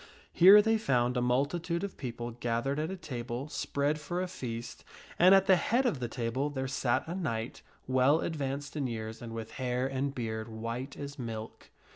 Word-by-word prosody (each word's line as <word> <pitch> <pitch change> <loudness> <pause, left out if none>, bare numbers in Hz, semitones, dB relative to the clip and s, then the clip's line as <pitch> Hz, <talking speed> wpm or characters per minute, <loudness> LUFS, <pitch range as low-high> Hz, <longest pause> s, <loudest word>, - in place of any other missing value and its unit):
Here 200 +4 +9
they 225 0 +2
found 125 - +1
a 125 - +1
multitude 160 +8 0
of 200 - -4
people 120 -2 -5
gathered 120 +4 -1
at 155 +2 -1
a 190 - -5
table 125 -2 -5
spread 145 +1 -1
for 175 +4 -3
a 185 - -1
feast, 120 -9 -6 0.4
and 185 +3 +8
at 195 0 +5
the 190 - +6
head 245 +8 +1
of 220 - +1
the 120 - -2
table 120 +4 -2
there 135 -2 -3
sat 130 -1 0
a 170 - -3
knight, 120 -11 -3 0.2
well 130 +4 +4
advanced 140 -2 -3
in 140 -3 -1
years 110 -1 -5
and 120 -1 -7
with 115 0 -6
hair 125 0 0
and 135 +1 -2
beard 110 -2 -3
white 115 +4 -5
as 140 0 -7
milk. 115 -2 -6
130 Hz, 190 wpm, -31 LUFS, 120-155 Hz, 0.4 s, Here